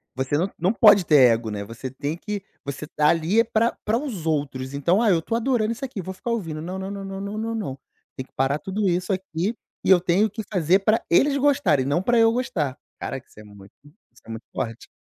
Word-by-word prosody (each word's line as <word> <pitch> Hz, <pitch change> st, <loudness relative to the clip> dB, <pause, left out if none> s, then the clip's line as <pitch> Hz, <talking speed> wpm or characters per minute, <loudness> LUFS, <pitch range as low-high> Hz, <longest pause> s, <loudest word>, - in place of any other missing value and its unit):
Você 130 Hz, +2 st, -1 dB
não 180 Hz, +6 st, +1 dB
não 185 Hz, +6 st, +1 dB
pode 205 Hz, -6 st, +6 dB
ter 135 Hz, -6 st, +6 dB
ego, 115 Hz, -1 st, -1 dB
né, 100 Hz, -1 st, -4 dB
você 115 Hz, +4 st, -7 dB
tem 145 Hz, +4 st, -4 dB
que 210 Hz, +1 st, -5 dB, 0.2 s
você 140 Hz, +2 st, -5 dB
tá 150 Hz, -2 st, +1 dB
ali 170 Hz, +7 st, +2 dB
é -, -, +6 dB
para 230 Hz, +1 st, 0 dB
para 220 Hz, +2 st, +2 dB
os 235 Hz, -, -5 dB
outros, 140 Hz, -4 st, -2 dB
então: 170 Hz, +9 st, +2 dB
"Ah, 225 Hz, -, +3 dB
eu 170 Hz, -, +3 dB
estou 225 Hz, +8 st, -3 dB
adorando 230 Hz, -2 st, +1 dB
isso 240 Hz, +4 st, -4 dB
aqui, 240 Hz, -7 st, -6 dB
vou 190 Hz, +2 st, -6 dB
ficar 235 Hz, +5 st, -5 dB
ouvindo", 165 Hz, -9 st, -3 dB
não, 185 Hz, +3 st, -5 dB
não, 190 Hz, +1 st, -5 dB
não, 200 Hz, -1 st, -6 dB
não, 195 Hz, +2 st, -5 dB
não, 225 Hz, +1 st, -3 dB
não, 140 Hz, -12 st, -4 dB, 0.4 s
tem 130 Hz, -, -6 dB
que -, -, -34 dB
parar 135 Hz, +2 st, +1 dB
tudo 195 Hz, +3 st, -1 dB
isso 180 Hz, +3 st, 0 dB
aqui 190 Hz, +3 st, -3 dB, 0.3 s
e -, -, +1 dB
eu 185 Hz, -2 st, +7 dB
tenho 185 Hz, +5 st, +2 dB
que 220 Hz, +2 st, -6 dB
fazer 185 Hz, 0 st, +3 dB
pra 215 Hz, +3 st, +1 dB
eles 280 Hz, +11 st, +4 dB
gostarem 265 Hz, -, +2 dB
e -, -, -3 dB
não 145 Hz, +5 st, +1 dB
pra 240 Hz, +4 st, +2 dB
eu 225 Hz, 0 st, +5 dB
gostar. 160 Hz, -, -2 dB, 0.2 s
Caraca, 130 Hz, -1 st, -6 dB
isso -, -, -17 dB
é -, -, -11 dB
muito 100 Hz, -1 st, -15 dB
isso 150 Hz, +10 st, -23 dB
é -, -, -15 dB
muito 115 Hz, 0 st, -7 dB
forte. 115 Hz, 0 st, -5 dB
180 Hz, 245 wpm, -23 LUFS, 140-215 Hz, 0.4 s, eu